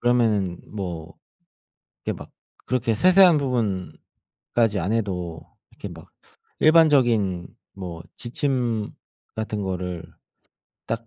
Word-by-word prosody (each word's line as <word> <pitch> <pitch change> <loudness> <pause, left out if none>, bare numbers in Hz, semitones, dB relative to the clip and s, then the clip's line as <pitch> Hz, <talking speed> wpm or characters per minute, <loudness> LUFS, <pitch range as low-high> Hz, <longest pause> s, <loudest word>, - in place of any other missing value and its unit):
그러면은 110 -7 +2
뭐 85 -6 -6 0.9
이렇게 - - -2
막 - - -11 0.3
그렇게 120 -3 +1
세세한 185 - +6
부분까지 105 - -2
안 90 +5 -1
해도 90 -7 -2 0.3
이렇게 - - -8
막 - - -12 0.5
일반적인 120 - +4 0.3
뭐 90 -4 -7
지침 120 -4 -1 0.5
같은 110 -1 -3
거를 90 -3 -3 0.8
딱 115 0 -3
110 Hz, 205 characters per minute, -24 LUFS, 90-125 Hz, 0.9 s, 세세한